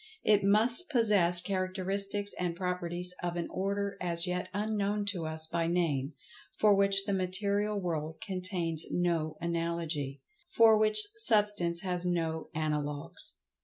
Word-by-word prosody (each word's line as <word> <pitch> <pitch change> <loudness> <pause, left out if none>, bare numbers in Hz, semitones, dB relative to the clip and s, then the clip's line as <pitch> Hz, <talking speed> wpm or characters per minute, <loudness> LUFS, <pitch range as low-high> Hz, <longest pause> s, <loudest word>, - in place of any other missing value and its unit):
It 210 -2 +3
must 225 - +4
possess 205 - +3
characteristics 195 +1 -2
and 175 -2 -2
properties 180 0 -2
of 175 -1 -3
an 170 -1 -3
order 200 +1 -2
as 170 -1 0
yet 180 0 -3
unknown 205 0 -1
to 175 -5 -3
us 160 0 +1
by 165 +1 -1
name—for 150 +4 -1
which 195 0 +4
the 200 - -1
material 200 +3 0
world 160 -4 -3
contains 180 -5 -2
no 165 -3 -1
analogy—for 170 - 0
which 215 - +3 0.2
Substance 205 - +3
has 180 -2 -1
no 165 -3 -2
analogues. 150 -2 -3
180 Hz, 125 wpm, -30 LUFS, 170-200 Hz, 0.2 s, must